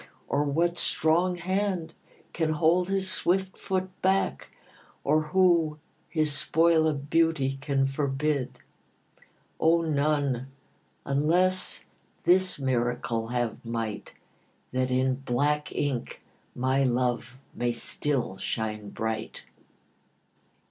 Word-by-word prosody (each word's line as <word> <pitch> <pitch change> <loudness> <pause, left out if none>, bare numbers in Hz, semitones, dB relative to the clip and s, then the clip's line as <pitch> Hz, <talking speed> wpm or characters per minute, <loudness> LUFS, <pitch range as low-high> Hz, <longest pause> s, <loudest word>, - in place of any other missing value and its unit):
Or 145 +1 +1
what 170 +4 +1
strong 175 +3 +2
hand 185 -2 -1 0.4
can 160 -2 0
hold 170 +4 +2
his 195 -1 0
swift 190 +1 0
foot 185 -1 -2
back? 190 - +1 0.5
Or 155 +2 +3
who 170 -3 +3 0.3
his 155 -3 +1
spoil 160 +1 +3
of 145 -2 -3
beauty 160 -5 +2
can 140 -1 +1
forbid? 140 0 -1 1.0
O, 165 +1 +4
none, 145 -4 0 0.6
unless 175 +7 +1 0.4
this 185 +1 +3
miracle 120 -3 -1
have 120 -1 -2
might, 115 -3 -4 0.6
That 130 0 0
in 130 0 +1
black 145 +3 0
ink 135 -5 -3 0.3
my 130 +2 +1
love 125 0 0
may 120 0 0
still 120 -2 -2
shine 105 -1 -3
bright. 110 +2 -4
145 Hz, 100 wpm, -27 LUFS, 130-170 Hz, 1.0 s, O